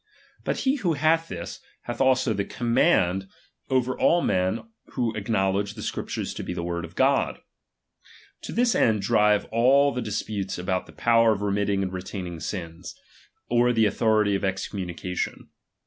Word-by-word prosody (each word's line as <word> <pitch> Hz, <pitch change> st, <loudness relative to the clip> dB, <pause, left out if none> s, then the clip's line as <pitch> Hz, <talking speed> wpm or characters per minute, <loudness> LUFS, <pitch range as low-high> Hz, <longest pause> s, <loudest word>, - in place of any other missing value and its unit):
But -, -, -2 dB
he 270 Hz, +1 st, +2 dB
who 180 Hz, -10 st, 0 dB
hath 160 Hz, +3 st, +2 dB
this, 85 Hz, -, -7 dB, 0.2 s
hath -, -, -4 dB
also 130 Hz, -3 st, +3 dB
the 100 Hz, -1 st, -1 dB
command 110 Hz, -, +1 dB, 0.4 s
over 130 Hz, -1 st, +1 dB
all 170 Hz, 0 st, +3 dB
men 95 Hz, +4 st, +1 dB, 0.3 s
who 120 Hz, -4 st, 0 dB
acknowledge 100 Hz, -1 st, 0 dB
the 110 Hz, -, -7 dB
Scriptures -, -, -4 dB
to -, -, -6 dB
be -, -, -5 dB
the 85 Hz, -, -3 dB
word 85 Hz, 0 st, -3 dB
of 80 Hz, -, -14 dB
God. -, -, +2 dB, 1.1 s
To -, -, -6 dB
this 240 Hz, 0 st, +2 dB
end 105 Hz, -3 st, +2 dB
drive 105 Hz, +1 st, +3 dB
all 135 Hz, +5 st, +4 dB
the 125 Hz, -, -3 dB
disputes 105 Hz, -2 st, -3 dB
about 90 Hz, +1 st, -2 dB
the -, -, -13 dB
power 115 Hz, -1 st, +4 dB
of 105 Hz, -1 st, -4 dB
remitting 100 Hz, -1 st, 0 dB
and 95 Hz, -1 st, -4 dB
retaining 90 Hz, -2 st, -6 dB
sins; 80 Hz, 0 st, -6 dB, 0.5 s
or 120 Hz, +1 st, +3 dB
the 115 Hz, -2 st, +3 dB
authority 105 Hz, 0 st, +2 dB
of 100 Hz, -, 0 dB
excommu 95 Hz, 0 st, -3 dB
nication. 90 Hz, +1 st, -4 dB
105 Hz, 165 wpm, -25 LUFS, 95-125 Hz, 1.1 s, all